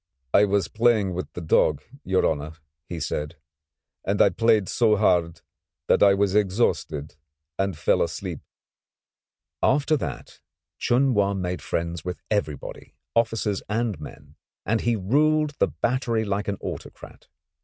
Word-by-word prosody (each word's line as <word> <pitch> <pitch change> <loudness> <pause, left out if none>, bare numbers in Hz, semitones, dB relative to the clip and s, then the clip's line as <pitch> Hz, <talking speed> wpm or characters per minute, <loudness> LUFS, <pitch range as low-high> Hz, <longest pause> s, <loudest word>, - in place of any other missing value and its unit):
"I 105 - +6
was 100 -1 +1
playing 110 -4 +2
with 90 +1 -5
the 90 - -6
dog, 80 -2 +2 0.2
your 95 0 +1
honour," 75 0 -1 0.4
he 85 - -4
said, 75 -1 -3 0.7
"and 100 +1 -1
I - - +6
played 110 0 +2
so 110 -3 +3
hard 90 -5 +1 0.4
that - - +3
I 100 -1 +6
was 100 -1 +1
exhausted 95 -8 0 0.4
and 95 -4 -1
fell - - +2
asleep." - - -3 1.2
After 145 +3 +3
that 70 - -6 0.4
Chun 130 +2 +2
Wa 100 -2 +2
made 90 -1 -3
friends 85 -1 -3
with 90 0 -5
everybody, 80 -10 -3 0.2
officers 115 -3 +1
and 110 -5 -1
men, 75 - -12 0.3
and 110 +1 +1
he 120 -1 +1
ruled 150 +9 +2
the - - +4
battery 115 - -1
like 100 0 -2
an 100 -1 -2
autocrat. - - -8
100 Hz, 140 wpm, -25 LUFS, 90-115 Hz, 1.2 s, I